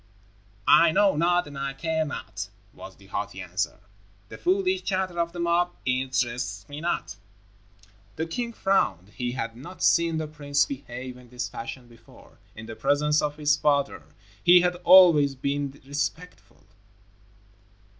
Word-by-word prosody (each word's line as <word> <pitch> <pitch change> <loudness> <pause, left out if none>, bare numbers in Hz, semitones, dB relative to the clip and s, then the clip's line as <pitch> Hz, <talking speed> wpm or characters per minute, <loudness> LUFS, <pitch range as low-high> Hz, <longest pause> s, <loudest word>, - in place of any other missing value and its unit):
"I 170 -1 +7
know 200 +1 +3
not 175 +3 +2
and 145 - -11
I 135 0 -3
care 160 +3 -1
not," 145 - -6 0.2
was - - -11
the - - -19
haughty - - -5
answer. - - -3 0.5
"The - - -10
foolish 370 +1 +1
chatter 185 -2 -2
of 170 0 0
the 175 - -8
mob 170 +1 +1
interests 130 -1 -1
me 145 +1 -8
not." 105 - -3 1.0
The 160 - -2
king 235 +8 -4
frowned. 190 - 0
He 120 +2 -4
had 115 -2 -4
not 170 +10 -9
seen 170 -1 +3
the 160 - -2
prince 145 -1 0
behave 130 -2 -7
in 125 -1 -16
this 125 0 -4
fashion 120 +1 -8
before. 120 -1 -19 0.2
In 110 - -9
the 115 0 -8
presence 150 +6 +2
of 150 0 -2
his 150 -1 +3
father, 140 - +1 0.4
he 175 0 +7
had 180 0 +1
always 170 -6 +6
been 140 +1 -3
respectful. 150 +5 -5
150 Hz, 150 wpm, -26 LUFS, 130-175 Hz, 1.0 s, I